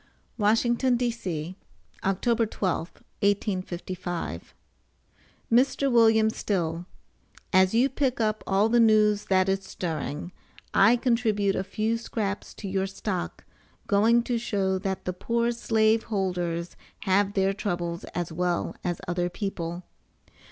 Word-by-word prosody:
WASHINGTON, 235 +4 +3
D.C., 190 -9 -3 0.5
October 225 +4 +1
12, 185 -5 -2 0.3
1855. 185 - -2 1.0
MR. 255 +4 +4
WM. 225 -2 +5
STILL: 175 -5 -2 0.7
AS 185 +2 +4
YOU 245 +4 +5
PICK 265 -1 -1
UP 215 -1 0
ALL 200 +2 +3
THE 240 +1 +3
NEWS 215 -2 +4
THAT 185 -1 +3
IS 195 0 0
STIRRING, 160 -2 -4 0.4
I 205 +5 +6
CONTRIBUTE 230 -5 +1
A 190 - -1
FEW 220 +4 -1
SCRAPS 205 -3 -4
TO 205 - -7
YOUR 190 0 -1
STOCK, 195 -1 -4 0.4
GOING 225 +4 +4
TO 240 -1 -1
SHOW 195 -4 0
THAT 190 -1 -3
THE 185 - -2
POOR 235 +5 0
SLAVE 225 -1 +2
HOLDERS 180 -4 -2 0.3
HAVE 200 +1 +2
THEIR 195 0 +2
TROUBLES 175 -4 -3
AS 175 -1 -4
WELL 175 +1 -1
AS 175 -1 -2
OTHER 175 0 0
PEOPLE. 175 -2 -4
200 Hz, 125 wpm, -26 LUFS, 180-225 Hz, 1.0 s, I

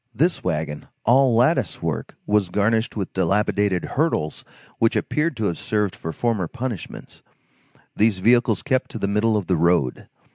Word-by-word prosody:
This 165 +8 +1
wagon, 75 -4 -3 0.2
all 130 0 +4
lattice 125 - +2
work, - - -4
was 105 -3 +1
garnished 110 +4 0
with 100 - -4
dilapidated 100 0 +1
hurdles 135 - -1 0.4
which 115 - +2
appeared 150 -3 -1
to 110 - -1
have 85 - -1
served 105 -3 -1
for 80 - -5
former 110 -3 -1
punishments. 120 -2 -7 0.7
These 105 -2 +2
vehicles 115 +2 +3
kept 130 -3 0
to - - -7
the 100 - -1
middle 105 +2 +2
of 100 - -2
the 90 -1 +1
road. 85 -6 +1
105 Hz, 155 wpm, -22 LUFS, 90-120 Hz, 0.7 s, all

